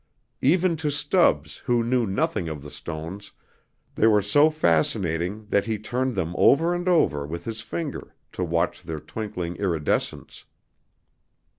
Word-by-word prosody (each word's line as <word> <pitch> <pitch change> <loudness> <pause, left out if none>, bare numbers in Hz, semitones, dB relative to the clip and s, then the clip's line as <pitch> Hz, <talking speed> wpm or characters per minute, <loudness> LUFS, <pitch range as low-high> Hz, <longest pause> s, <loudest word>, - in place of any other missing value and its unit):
Even 170 +4 +3
to 155 -1 -1
Stubbs, 145 - +2
who 120 -1 +2
knew 120 -1 +1
nothing 95 -2 -1
of 75 -3 -6
the 75 - -10
stones, 85 +5 -7 0.6
they 110 - +3
were 105 -2 +4
so 145 +10 +5
fascinating 90 - 0
that 100 0 +1
he 110 -1 -1
turned 125 +4 -2
them 85 -3 -2
over 165 +5 +5
and 175 +1 -1
over 115 - +3
with 85 +2 -6
his 115 -1 -4
finger 150 +5 -5 0.2
to 90 - -3
watch 85 0 0
their 80 -2 -5
twinkling 90 -4 -5
iridescence. 85 -7 -2
105 Hz, 145 wpm, -25 LUFS, 85-135 Hz, 0.6 s, so